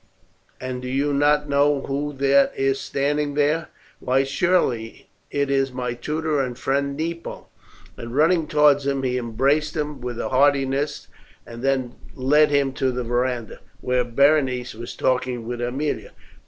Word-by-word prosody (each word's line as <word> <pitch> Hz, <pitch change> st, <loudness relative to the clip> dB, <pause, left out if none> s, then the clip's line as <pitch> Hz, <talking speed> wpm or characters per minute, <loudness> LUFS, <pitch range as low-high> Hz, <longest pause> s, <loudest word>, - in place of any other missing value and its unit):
And 130 Hz, -1 st, -5 dB
do 125 Hz, -, -6 dB
you 140 Hz, +3 st, 0 dB
not 150 Hz, +1 st, +2 dB
know 140 Hz, 0 st, +2 dB
who 145 Hz, +2 st, -3 dB
that 140 Hz, 0 st, +3 dB
is 135 Hz, 0 st, +1 dB
standing 145 Hz, +2 st, -1 dB
there?" 150 Hz, +2 st, +1 dB, 0.3 s
"Why, 130 Hz, +1 st, +2 dB
surely 135 Hz, -6 st, -1 dB, 0.2 s
it 140 Hz, -1 st, -1 dB
is 135 Hz, -1 st, +1 dB
my 125 Hz, -1 st, -3 dB
tutor 150 Hz, +4 st, -2 dB
and 125 Hz, -2 st, -4 dB
friend 140 Hz, +1 st, -1 dB
Nepo;" 165 Hz, +1 st, -5 dB, 0.5 s
and 115 Hz, +1 st, -7 dB
running 160 Hz, +2 st, +3 dB
towards 145 Hz, -2 st, +4 dB
him 140 Hz, -1 st, -1 dB
he 125 Hz, -1 st, 0 dB
embraced 135 Hz, +7 st, 0 dB
him 150 Hz, -3 st, -3 dB
with 125 Hz, -1 st, -5 dB
heartiness 140 Hz, +1 st, +1 dB, 0.4 s
and 115 Hz, 0 st, -9 dB
then 130 Hz, -2 st, 0 dB, 0.2 s
led 150 Hz, +4 st, +4 dB
him 140 Hz, -2 st, +1 dB
to 130 Hz, -1 st, 0 dB
the 125 Hz, 0 st, -3 dB
verandah, 120 Hz, -1 st, -2 dB, 0.2 s
where 125 Hz, 0 st, +1 dB
Berenice 130 Hz, 0 st, +2 dB
was 115 Hz, +2 st, -8 dB
talking 125 Hz, -2 st, -1 dB
with 120 Hz, 0 st, -4 dB
Aemilia. 135 Hz, +5 st, -2 dB
135 Hz, 150 wpm, -23 LUFS, 125-145 Hz, 0.5 s, towards